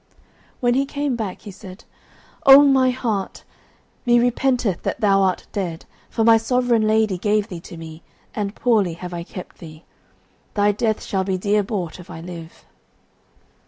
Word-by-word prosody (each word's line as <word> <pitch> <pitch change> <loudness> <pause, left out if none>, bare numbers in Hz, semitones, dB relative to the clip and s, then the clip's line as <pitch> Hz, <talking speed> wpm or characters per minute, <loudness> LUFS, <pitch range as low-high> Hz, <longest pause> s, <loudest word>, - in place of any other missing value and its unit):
When 245 -1 +3
he 275 +2 +1
came 285 -2 -2
back 215 -5 -5
he 205 - -9
said, 190 +2 -12 0.6
"O 275 +1 +10
my 270 -2 +4
white 250 - +1
hart, 215 -7 -3 0.6
me 240 0 +4
repenteth 245 -5 +1
that - - -3
thou 195 -2 +3
art 190 -2 0
dead, 175 -5 -4 0.2
for 225 - -1
my 225 0 +7
sovereign 235 -1 +1
lady 215 -4 +2
gave 210 +2 +1
thee 175 - -6
to 170 0 -11
me, 160 0 -10 0.3
and 205 -1 -3
poorly 215 -8 +2
have 180 +1 -8
I 170 - -4
kept 180 +1 -10
thee. 155 -1 -12 0.7
Thy 205 0 +3
death 215 +1 -1
shall 190 -2 -1
be 190 -1 -1
dear 205 +3 +1
bought, 190 -5 -4
if 180 - -13
I - - -8
live." 165 -1 -10
205 Hz, 170 wpm, -21 LUFS, 180-235 Hz, 0.7 s, O